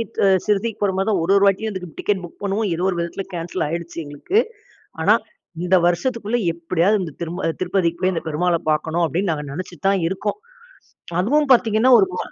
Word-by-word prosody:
ட் - - -6 0.3
சிரடிக்கு 210 +1 0
போற 200 -2 +2
மாரி 195 +2 0
தான் 195 -5 +1
ஒரு 180 - +1
ஒரு 200 - +4
வாட்டியும் 200 +3 +2
அதுக்கு 180 -4 -7
டிக்கெட் 200 -2 0
புக் 175 - -11
பண்ணுவோம். 200 +1 0
ஏதோ 175 - -2
ஒரு 180 - -2
விதத்தில 170 +3 -3
கேன்சல் 170 0 -3
ஆயிடுச்சு 170 +2 -5
எங்களுக்கு. 145 - 0 0.6
ஆனா - - +5 0.5
"இந்த 180 +1 +3
வருஷத்துக்குள்ள 230 +5 0
எப்படியாவது 175 +5 +1
இந்த 160 -4 -7
திரும்ப 170 0 -2
திருப்பதிக்கு 180 -2 0
போய் 185 0 +2
அந்த 165 - -3
பெருமாளை 170 +2 +1
பார்க்கணும்." 160 +3 0
அப்படீன்னு 175 +3 -1
நாங்க 150 -2 -3
நெனச்சுட்டு 180 +3 -4
தான் 195 -3 +1
இருக்கோம். 195 - -3 0.8
அதுவும் 290 +8 +2
பார்த்தீங்கன்னா, 235 +1 +3
ஒரு 190 - +4
வ - - -4
185 Hz, 185 wpm, -21 LUFS, 170-205 Hz, 0.8 s, ஆனா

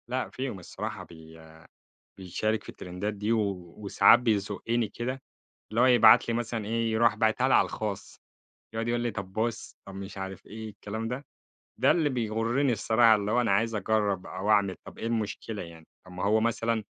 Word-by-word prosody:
لأ، 130 +1 -2
فيهم 130 -7 -5
الصراحة 90 - -6
بي 80 0 -14 0.8
بيشارك 105 +4 -2
في - - -12
الترندات 90 +4 -5
دي، 105 +2 -2
و 100 -6 -1
وساعات 100 -1 +5
بيزقني 110 +1 0
كده، 130 +3 -4 0.5
اللي 115 +2 +1
هو - - +6
يبعت 120 -3 +7
لي 115 - 0
مثلًا 115 -2 -3
إيه؟ 115 +1 -1
يروح 115 +1 +3
باعتها 110 +3 +2
لي 130 - +3
على - - +5
الخاص. 105 -3 -5 0.6
يقعد 115 +1 -2
يقول 120 0 0
لي 120 -1 -1
طب 100 -2 -7
بُص، 115 +1 -3
طب 95 - -9
مش 95 0 -8
عارف 95 0 -7
إيه؟ 110 +1 -8
الكلام 105 +2 -6
ده، 125 +5 -5 0.5
ده 130 +4 +4
اللي 160 -4 +3
بيغرني 120 +2 0
الصراحة 115 +1 +4
اللي 105 0 -1
هو 125 - +3
أنا 120 - +1
عايز 115 +3 +1
أجرّب 105 -2 0
أو 95 +3 -3
أعمل، 100 -3 +3
طب - - -12
إيه - - -4
المشكلة 110 -1 -3
يعني؟ 80 -2 -12 0.2
طب 90 - -13
ما 90 +1 -4
هو 110 +2 +3
مثلًا، 115 -1 0
110 Hz, 185 wpm, -28 LUFS, 100-115 Hz, 0.8 s, يبعت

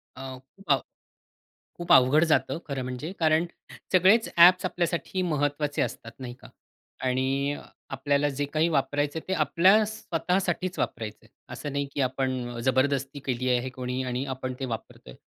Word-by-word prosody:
अ, 130 - -8 0.2
खूप 155 +8 -22
अव 135 -2 +4 1.0
खूप 175 - -3
अवघड 135 +4 +6
जातं - - +2
खरं 135 -3 -3
म्हणजे 130 +6 -5
कारण 160 0 +3 0.5
सगळेच 190 +5 +5
ॲप्स 180 +2 +7
आपल्यासाठी 180 +1 -1
महत्त्वाचे 145 -3 0
असतात 115 -1 -4
नाही 125 -2 -6
का? 125 -1 -15 0.6
आणि 135 +2 0
अ, - - -7 0.3
आपल्याला 140 +2 +1
जे 145 +1 -2
काही 155 +3 +1
वापरायचं 145 +1 0
आहे - - -19
ते 190 - 0
आपल्या 185 +6 +4
स्वतःसाठीच 185 -2 -2
वापरायचं 110 -2 -3
आहे. - - -22 0.2
असं 145 - -5
नाही, 140 0 0
की 140 - -1
आपण 130 -1 -1
अ, - - -5
जबरदस्ती 135 +2 +1
केली 130 -1 -1
आहे 125 +2 -3
कोणी 125 0 -4
आणि 125 +1 -2
आपण 130 0 -4
ते 135 - -2
वापरतो 115 - -7
आहे. - - -12
140 Hz, 165 wpm, -27 LUFS, 130-165 Hz, 1.0 s, ॲप्स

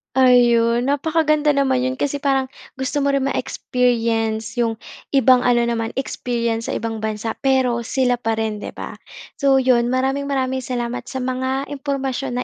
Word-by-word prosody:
Ayon, 240 -2 +4
napakaganda 305 0 +2
naman 265 -2 +2
'yon, 260 - -2
kasi 285 +1 -2
parang 270 -2 0 0.2
gusto 265 +2 -2
mo 280 0 +1
rin 275 - +1
ma-experience 230 -4 -1
'yong 230 -1 +1 0.4
ibang 260 -2 +6
ano 245 -1 +2
naman, 230 -1 -2
experience 235 -3 -2
sa - - -2
ibang 225 0 -3
bansa, 220 +1 -3
pero 260 -3 +2
sila 245 +1 0
pa 225 -2 -1
rin, 220 -1 -2
'di - - -8
ba. - - -6 0.5
So 275 -1 +4
'yon, 250 -2 +3
maraming 265 +2 0
maraming 260 -2 -1
salamat 245 -1 -4
sa 260 -1 -4
mga 260 +2 -2
impormasyon 270 -3 -3
255 Hz, 155 wpm, -20 LUFS, 235-270 Hz, 0.5 s, ibang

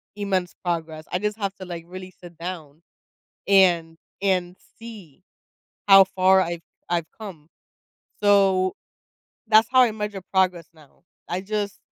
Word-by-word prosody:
immense 190 -3 -2
progress." 160 -2 -3
I 180 - -1
just 210 +2 -2
have 195 -1 -2
to, 190 - -9
like, 170 -2 -7
really 185 +1 -10
sit 175 -2 -13
down 165 -3 -8 0.7
and 175 -4 +4 0.3
and 185 -2 0 0.2
see 205 -9 -12 0.7
how 195 0 +9
far 190 0 +3
I've 170 -1 -4 0.3
I've 170 -2 -1
come. 170 -8 -10 0.7
So, 195 -2 +3 0.7
that's 220 0 +5
how 255 -1 +6
I 245 - +3
measure 210 -2 -5
progress 185 -3 +1
now. 155 -1 -22 0.3
I 180 - -2
just 205 0 -3
185 Hz, 135 wpm, -23 LUFS, 170-200 Hz, 0.7 s, how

